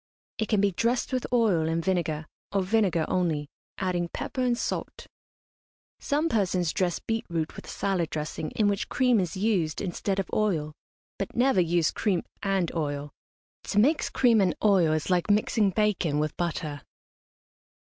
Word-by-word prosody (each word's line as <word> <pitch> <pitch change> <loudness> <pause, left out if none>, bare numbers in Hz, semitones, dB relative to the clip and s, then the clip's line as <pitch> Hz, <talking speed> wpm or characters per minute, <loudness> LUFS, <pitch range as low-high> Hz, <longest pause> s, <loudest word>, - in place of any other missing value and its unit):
It 220 - 0
can 210 -3 +2
be 205 -1 +3
dressed 235 +8 0
with 255 - -1
oil 205 -10 +3
and 165 0 -1
vinegar, 165 -5 0 0.3
or 195 -1 +1
vinegar 185 -5 +2
only, 160 -5 0 0.3
adding 175 -2 -1
pepper 260 - -4
and 245 -1 +2
salt. - - -4 0.9
Some 295 +3 0
persons 185 - +1
dress 180 -2 0
beet 225 0 -2
root 165 -2 -2
with - - -10
a - - -9
salad 185 -5 -1
dressing 155 0 -4
in 215 - +3
which 200 0 -1
cream 250 -3 +3
is 185 0 -2
used 185 -7 0
instead 195 +1 -2
of 195 - -1
oil; 165 -8 0 0.5
but - - -4
never 245 -5 +4
use 170 -1 +2
cream 195 -5 0 0.2
and 195 -4 0
oil. 145 -3 -3 0.5
To - - -3
mix 285 +9 +3
cream 235 -4 +4
and 185 -3 +2
oil 190 -7 +4
is 155 +4 -1
like 180 +2 +1
mixing 210 0 +3
bacon 190 -6 +1
with 150 0 -1
butter. 155 -4 -3
185 Hz, 165 wpm, -27 LUFS, 165-215 Hz, 0.9 s, never